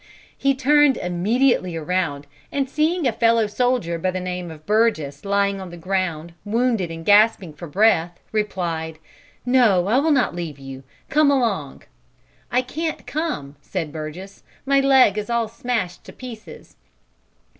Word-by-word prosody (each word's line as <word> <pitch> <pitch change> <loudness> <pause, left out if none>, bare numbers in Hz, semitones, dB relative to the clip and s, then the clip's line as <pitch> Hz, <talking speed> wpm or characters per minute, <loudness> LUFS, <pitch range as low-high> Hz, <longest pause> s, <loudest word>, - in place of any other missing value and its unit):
"He 275 0 +1
turned 290 0 +4
immediately 185 +2 +1
around, 160 -3 -2 0.3
and 275 -1 -1
seeing 315 +4 0
a 250 - +3
fellow 230 0 +3
soldier 210 -6 0
by 185 - 0
the 185 0 -3
name 180 -1 -4
of 155 -1 -12
Burgess 205 -11 +1
lying 200 0 0
on 185 - -7
the 175 - -10
ground, 170 -2 -2
wounded 225 -3 0
and 165 0 -8
gasping 205 -5 +4
for 160 +3 -9
breath, 175 -1 +2
replied, 170 -7 -2 0.5
'No, 235 -8 +4
I 225 +6 +3
will 315 +3 +1
not 270 -9 +2
leave 165 -5 -5
you; 135 -1 -9 0.3
come 300 0 +4
along.' 225 - -1 0.7
'I 250 - +3
can't 315 +5 -4
come,' 285 - -4
said 160 0 -4
Burgess, 165 +6 -8 0.2
'my 275 0 +3
leg 265 -6 +4
is 210 - -6
all 235 -1 0
smashed 220 -6 -3
to - - -11
pieces.' 235 -4 -11
200 Hz, 150 wpm, -22 LUFS, 170-250 Hz, 0.7 s, turned